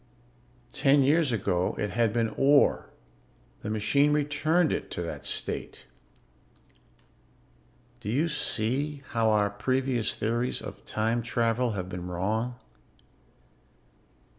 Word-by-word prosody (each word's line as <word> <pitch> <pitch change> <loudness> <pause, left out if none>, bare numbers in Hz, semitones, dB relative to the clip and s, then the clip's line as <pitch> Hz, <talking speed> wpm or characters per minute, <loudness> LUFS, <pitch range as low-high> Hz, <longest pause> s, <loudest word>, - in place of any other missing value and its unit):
Ten 140 0 +4
years 150 +1 +3
ago 90 -5 0
it 105 - -2
had 115 +1 +2
been 115 0 0
ore. 140 +1 +4 0.7
The 105 - -5
machine 140 +7 +2
returned 150 +3 +2
it - - -4
to 85 - -4
that 85 - -6
state. 65 - -4 2.1
"Do 105 - -6
you 145 +9 +1
see 140 0 -1
how 115 -1 +2
our 105 -2 +2
previous 130 +2 -1
theories 120 +3 -1
of - - -9
time 115 +2 0
travel 115 0 0
have 95 -3 -4
been 90 -1 -6
wrong? 110 +7 -2
120 Hz, 115 wpm, -28 LUFS, 105-140 Hz, 2.1 s, Ten